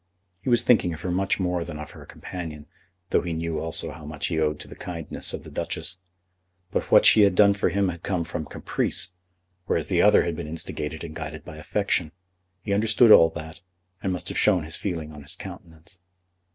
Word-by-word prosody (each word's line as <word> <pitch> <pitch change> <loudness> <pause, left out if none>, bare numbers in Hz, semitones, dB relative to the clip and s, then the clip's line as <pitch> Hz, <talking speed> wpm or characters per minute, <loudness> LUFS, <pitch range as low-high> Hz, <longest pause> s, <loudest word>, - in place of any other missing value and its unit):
He 130 - -3
was 120 -1 +4
thinking 90 -8 +3
of 80 - -12
her 90 - -2
much 95 +3 0
more 90 -2 0
than 80 -3 -7
of 75 0 -8
her - - -13
companion, 80 -5 -7 0.5
though - - +3
he 85 -2 -3
knew 80 0 -2
also 80 0 -2
how 80 - -11
much 75 0 -4
he 80 -3 -1
owed 75 -1 0
to - - -7
the - - -11
kindness 85 -3 -4
of - - -5
the - - -11
Duchess. 90 +1 -3 0.7
But - - -2
what - - +6
she 110 - +7
had 100 -2 +5
done 100 +1 +6
for 100 -2 0
him 100 +1 +1
had 85 -2 -6
come 90 -3 -1
from 80 -1 -4
caprice, 90 +5 0 0.6
whereas - - 0
the - - +3
other - - +6
had 85 -2 -2
been 80 -1 -6
instigated 80 -1 -3
and 80 -2 -7
guided 80 -1 -7
by 80 - -9
affection. 85 -1 -1 0.5
He 100 - -1
understood 110 +2 +4
all 80 -5 +9
that, 80 -1 -8 0.4
and 95 - -1
must 90 -3 -4
have - - -1
shown 95 -6 +3
his 80 +2 -2
feeling 80 -6 -4
on 75 -1 -10
his 70 - -7
countenance. 80 +2 -11
85 Hz, 215 wpm, -25 LUFS, 80-95 Hz, 0.7 s, all